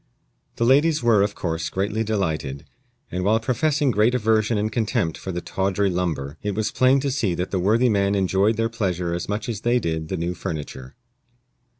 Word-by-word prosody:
The 115 - 0
ladies 145 +3 +3
were, 115 -4 +4
of 100 0 0
course, 80 -1 -3
greatly 100 +5 -1
delighted; 80 -10 -2 0.5
and 90 0 -2
while 110 +3 +3
professing 145 +4 +1
great 110 +3 +2
aversion 110 -1 +2
and 105 +1 -1
contempt 110 -7 0
for 95 - -6
the 90 0 -4
"tawdry 95 +1 0
lumber," 80 -5 -3
it 105 -2 -3
was 110 0 -1
plain 130 +2 +4
to 140 0 -1
see 110 -10 0
that 90 +2 -3
the 95 - 0
worthy 110 +7 +3
man 100 -3 +2
enjoyed 100 +3 +2
their 115 0 +1
pleasure 90 -6 -2
as 85 +2 -4
much 105 +4 -2
as 110 -3 -4
they 120 +2 +2
did 80 -7 -2
the 95 - -3
new 85 +2 -2
furniture. 70 -6 -6
100 Hz, 195 wpm, -23 LUFS, 90-115 Hz, 0.5 s, were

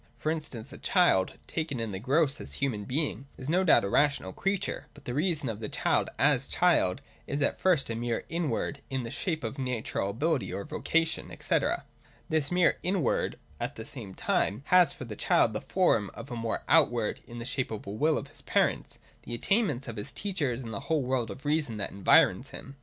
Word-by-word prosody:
For 155 +6 -1
instance, 140 -5 -5
a - - -8
child, 175 - +3
taken 155 -6 -3
in 115 -2 -2
the 95 - -4
gross 140 +5 +2
as - - -6
human 115 -7 -1
being, 140 +1 -1
is 135 +3 -4
no 185 +2 +3
doubt 170 - +5
a - - 0
rational 140 -8 +2
creature; 195 +1 -2
but - - -16
the 120 - -3
reason 155 -1 +1
of 110 -3 -3
the 110 - -4
child - - +1
as - - +3
child - - +2 0.2
is 140 0 -1
at - - 0
first 180 -7 +3
a 115 - -2
mere 120 0 -2
inward, 150 -4 -2
in 130 -2 -2
the 115 - -6
shape 160 +1 -2
of 115 +5 -4
his 135 - -2
natural 115 -5 -2
ability 145 +7 0
or 100 - -3
vocation, 165 +8 0
&c. - - +2 0.7
This 155 -3 +1
mere 180 -1 +3
inward, 180 -7 0 0.2
at - - -3
the - - -7
same 95 -1 -7
time, 105 +7 0
has 180 -3 +5
for 130 - -8
the 110 -3 -6
child 110 - +3
the 105 - -3
form 115 - +2
of 140 - -9
a - - -3
mere 115 -1 -2
outward, 120 -9 +3
in 120 - -9
the 115 - -5
shape 130 0 -1
of 110 -2 -5
the 100 - -6
will 150 +9 +2
of - - -5
his - - -9
parents, - - 0 0.2
the 120 - -5
attainments 150 - +1
of 115 -2 -6
his 105 - -4
teachers, 145 - -2
and 115 -2 -6
the 100 - -2
whole 155 -4 +2
world 125 -2 0
of 135 - -9
reason 145 -7 0
that 100 - -3
environs 100 0 +4
him. 135 - -9
135 Hz, 215 wpm, -29 LUFS, 115-160 Hz, 0.7 s, doubt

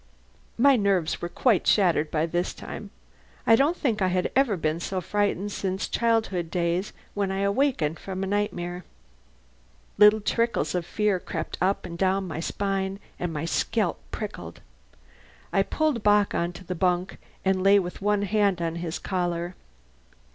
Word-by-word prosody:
My 275 +3 +6
nerves 195 -6 +1
were 175 - -3
quite 220 0 +2
shattered 170 -6 +3
by 155 0 +1
this 175 +2 -2
time. - - -8 0.6
I 225 - +7
don't 295 +8 +2
think 225 -7 0
I 185 - +3
had 180 0 0 0.3
been 155 +1 0
so 185 +2 -2
frightened 205 +1 -1
since 190 -1 -2
childhood 220 -7 0
days 175 +2 -1 0.2
when 200 -2 -1
I 195 0 -1
awakened 200 - +1
from 190 0 -5
a - - 0
nightmare. 185 -3 -2 1.2
Little 210 +1 +7
trickles 230 +2 0
of 175 -2 -2
fear 210 -3 +1
crept - - -5
up 190 +2 +1
and 170 -1 -7
down 190 0 +1
my 160 - -5
spine 195 +2 -2 0.2
and 175 -1 -2
my 155 0 -3
scalp 200 +3 0
prickled. 210 -1 -7 0.9
I - - +4
pulled 310 -7 0
Bock 205 0 +3
on 170 +1 0
the 185 - -3
bunk, 180 +1 0 0.3
and 190 -1 +2
lay 195 +2 +6
with 180 -1 -3
one 205 0 +1
hand 205 -2 +2
on 165 -1 -2
his 170 -1 -3
collar. 175 -2 -2
190 Hz, 155 wpm, -26 LUFS, 175-205 Hz, 1.2 s, I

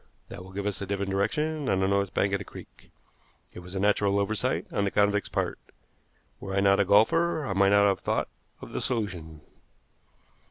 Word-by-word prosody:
That 90 - -9
will 95 - -13
give 100 +1 -5
us 105 -1 -2
a 100 - -4
different 100 0 -2
direction 150 +9 -1
on 95 - +2
the 95 - +2
north 100 -1 +1
bank 100 0 0
of 100 - +1
the - - -6
creek. - - -14 0.6
It - - -9
was 90 +2 -10
a - - -1
natural 100 0 +2
oversight 100 +2 -1
on 100 - 0
the 100 - +1
convict's 105 0 +1
part. - - -2 0.8
Were 95 0 -5
I - - +2
not 100 0 +4
a 100 - +3
golfer 150 - +3
I 100 - -2
might 100 0 +4
not 100 0 +5
have 100 - +1
thought - - -1 0.3
of - - -10
the - - -3
solution." 90 -10 -3
100 Hz, 205 wpm, -27 LUFS, 95-105 Hz, 0.8 s, not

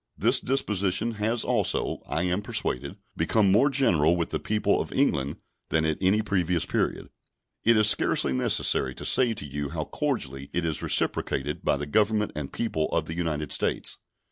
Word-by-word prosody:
This - - +5
disposition 110 -4 0
has 110 +2 +1
also, - - 0
I 80 - -1
am 90 +2 0
persuaded, 70 -6 -2 0.2
become 105 -4 +2
more 120 +9 +4
general 85 - +3
with 85 -1 -2
the - - -2
people 105 0 0
of - - -6
England 70 +1 0 0.3
than 80 0 +1
at 80 -1 -1
any 100 +3 +2
previous 90 -5 0
period. - - -2 0.5
It 115 -1 +4
is 110 -1 +5
scarcely 70 - +2
necessary 65 0 +1
to - - -8
say 120 -3 +3
to 75 - -7
you 70 0 -4
how - - -3
cordially 70 +1 -3
it 85 -1 -1
is 80 -2 -1
reciprocated 70 +2 -1
by - - +1
the 75 - -4
Government 105 +6 +1
and 75 -2 -5
people 80 -9 -2
of - - 0
the 80 - -6
United 80 -4 -3
States. - - -1
90 Hz, 175 wpm, -26 LUFS, 75-105 Hz, 0.5 s, This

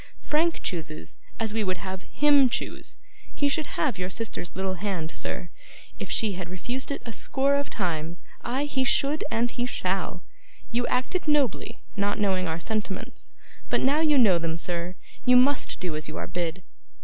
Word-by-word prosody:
Frank 325 +2 +2
chooses 80 - -4 0.2
as 220 -2 -1
we 220 -1 +1
would 185 -2 0
have 190 0 -6
HIM 285 -3 +6
choose. - - -4 0.4
He 285 - +2
should 305 +2 -1
have 250 -11 +1
your 180 0 -1
sister's 190 -4 -3
little 190 0 -1
hand, 180 -4 -2
sir, 175 - -4 0.5
if - - -4
she 215 -3 +2
had 180 -2 -5
refused 245 +9 -3
it 280 - -3
a 230 - -5
score 275 +5 +2
of 280 0 +1
times; 170 -3 -2 0.2
ay, 260 +4 0
he 270 -3 +1
should, 280 +3 +2
and 235 -1 +1
he 245 0 -1
shall! 190 -5 -1 0.5
You 240 +1 +1
acted 285 +8 0
nobly, 290 -8 +1
not 205 0 +1
knowing 190 -4 +2
our 160 +1 -2
sentiments, 210 +1 -3 0.4
but - - +2
now 280 +4 +4
you 305 -2 +4
know 200 -9 +6
them, 165 -1 -1
sir, 175 +1 -3 0.3
you 250 -1 +6
must 270 +2 +3
do 175 -4 -2
as 155 0 -2
you 155 - -6
are - - -2
bid. 175 0 -3
210 Hz, 180 wpm, -27 LUFS, 180-265 Hz, 0.5 s, HIM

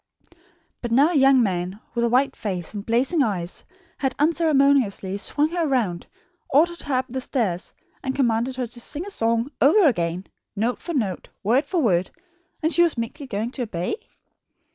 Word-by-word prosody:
But 240 - -3
now 275 +7 +5
a - - -2
young 270 -2 +6
man 185 0 -2
with 235 - 0
a 235 - +2
white 260 +4 +2
face 185 -4 -4
and 205 -1 -5
blazing 255 - +1
eyes 190 -8 -2 0.4
had 265 -2 -1
unceremoniously 280 - +2
swung 295 +9 0
her 340 -1 -1
round, 220 -11 -1 0.4
ordered 340 +5 +3
her 285 -3 -2
up 255 - +1
the 260 +2 -4
stairs, 205 -9 -2 0.3
and 265 -1 -3
commanded 240 -1 +1
her 255 -1 -2
to 240 +1 -8
sing 305 +8 -4
a 405 - -6
song 230 - 0
over 335 +6 +6
again, 175 - 0 0.3
note 230 +4 -1
for 340 -2 -4
note, 200 -9 -2
word 245 +8 +2
for 350 -5 0
word, 180 -5 +2 0.5
and 320 +1 +3
she 345 - +5
was 340 -6 +3
meekly 230 +5 -5
going 225 +1 -3
to 265 - -5
obey. 180 -7 -2
250 Hz, 180 wpm, -23 LUFS, 205-285 Hz, 0.5 s, young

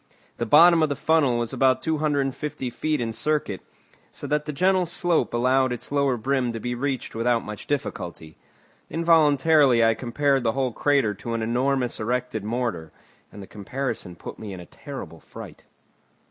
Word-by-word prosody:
The 120 - -2
bottom 165 +6 +7
of 155 - +2
the 145 - -1
funnel 145 -4 +2
was 120 -1 -3
about 130 -1 +3
250 145 -3 -1
feet 155 +4 -1
in 115 -2 -2
circuit, 135 -4 -1 0.5
so - - -7
that 150 0 -1
the 150 - -3
gentle 185 +3 +2
slope 170 0 0
allowed 130 +2 +2
its 125 - -5
lower 140 -3 +1
brim 130 +1 0
to 115 - -4
be 120 +2 -3
reached 130 +1 -3
without 115 +1 +1
much 105 -1 -8
difficulty. 85 - -4 0.5
Involuntarily 150 -6 +4
I 115 - +4
compared 135 +3 0
the 115 -1 +1
whole 130 -2 -1
crater 135 -4 +1
to 115 +4 -5
an 115 - -2
enormous 125 +2 0
erected 120 -1 -2
mortar, 105 -8 -3 0.4
and 100 - -10
the - - -9
comparison 105 -2 -5
put - - -9
me 105 -3 -7
in 95 - -8
a 90 - -10
terrible 90 - -9
fright. - - -12
130 Hz, 170 wpm, -24 LUFS, 115-145 Hz, 0.5 s, bottom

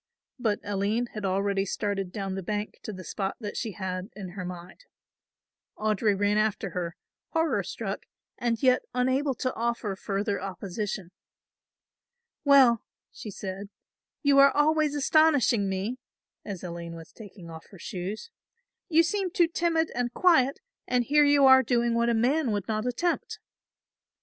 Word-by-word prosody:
But 220 -4 0
Aline 205 +4 -1
had 210 -2 -4
already 195 +1 +1
started 200 -1 -2
down 195 -1 -4
the 195 - -3
bank 210 +3 -4
to - - -6
the 185 -2 -8
spot 195 +1 -3
that 210 -3 -6
she 220 - -3
had 185 0 -4
in 195 -3 -7
her 185 +1 -6
mind. 180 - -9 0.9
Audry 215 -1 +1
ran 205 +1 +2
after 215 -3 0
her, 170 -1 -4 0.4
horror 325 -1 +2
struck - - -5 0.3
and 235 -1 -2
yet 255 -1 +5
unable 260 +2 +1
to 255 +1 -2
offer 230 -3 -2
further 200 +1 -2
opposition. 195 -1 -5 1.3
"Well," 265 -5 +6 0.3
she 215 - -8
said, 195 0 -6 0.5
"you 280 -1 +5
are 275 0 +8
always 300 +1 +2
astonishing 285 -8 +3
me," 200 +7 -3 0.4
as 195 -4 -7
Aline 170 -1 -6
was 165 -1 -11
taking 195 -6 -12
off 160 0 -11
her 195 - -13
shoes; 190 - -6 0.6
"you 330 0 +5
seem 385 +2 -1
too 345 -1 +3
timid 330 -1 0
and 240 0 -1
quiet, 280 -5 +3 0.3
and 250 -1 +2
here 295 +4 +4
you 285 -1 +5
are 265 0 +8
doing 240 -1 +1
what 235 0 +2
a 235 - +2
man 255 +3 +2
would 205 -2 -2
not 215 +1 -1
attempt." 335 +8 -1
215 Hz, 155 wpm, -27 LUFS, 195-265 Hz, 1.3 s, are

